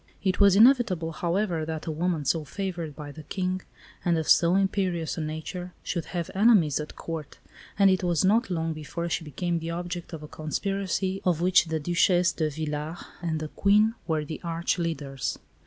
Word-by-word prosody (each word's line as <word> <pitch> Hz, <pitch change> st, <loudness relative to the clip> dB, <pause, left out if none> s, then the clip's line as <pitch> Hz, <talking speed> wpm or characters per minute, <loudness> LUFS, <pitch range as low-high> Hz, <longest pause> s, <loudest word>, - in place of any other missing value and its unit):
It 190 Hz, -2 st, +1 dB
was 200 Hz, -2 st, +6 dB
inevitable, 215 Hz, -8 st, +5 dB
however, 175 Hz, 0 st, -1 dB
that 160 Hz, 0 st, -4 dB
a 160 Hz, -, -2 dB
woman 165 Hz, -1 st, -1 dB
so 160 Hz, +3 st, +1 dB
favoured 170 Hz, -1 st, -4 dB
by 145 Hz, 0 st, -7 dB
the 155 Hz, -, -10 dB
King, 185 Hz, +3 st, -2 dB, 0.4 s
and 170 Hz, -2 st, +2 dB
of 160 Hz, -, -2 dB
so 170 Hz, +1 st, +5 dB
imperious 190 Hz, -4 st, 0 dB
a 165 Hz, -, -3 dB
nature, 160 Hz, +4 st, -5 dB
should 170 Hz, -, -2 dB
have 170 Hz, -2 st, -4 dB
enemies 195 Hz, -, +4 dB
at 150 Hz, -, -6 dB
Court; 160 Hz, -3 st, -6 dB, 0.4 s
and 195 Hz, -1 st, +6 dB
it 185 Hz, 0 st, +1 dB
was 175 Hz, 0 st, +2 dB
not 220 Hz, +4 st, +3 dB
long 165 Hz, -2 st, -1 dB
before 165 Hz, +3 st, -5 dB
she 165 Hz, -, -1 dB
became 170 Hz, +3 st, -2 dB
the 165 Hz, 0 st, -5 dB
object 175 Hz, 0 st, -4 dB
of 160 Hz, -3 st, -7 dB
a -, -, -7 dB
conspiracy 190 Hz, +4 st, -2 dB
of 175 Hz, -4 st, +2 dB
which 180 Hz, +1 st, +4 dB
the 160 Hz, -1 st, -2 dB
Duchesse 175 Hz, +3 st, +3 dB
de 155 Hz, -2 st, -1 dB
Villars 150 Hz, +2 st, -4 dB, 0.2 s
and 165 Hz, -2 st, -1 dB
the 155 Hz, -1 st, -5 dB
Queen 210 Hz, +5 st, +3 dB
were 155 Hz, -2 st, 0 dB
the 155 Hz, -, -6 dB
arch 170 Hz, +1 st, -1 dB
leaders. 140 Hz, -5 st, -3 dB
170 Hz, 190 wpm, -27 LUFS, 155-185 Hz, 0.4 s, was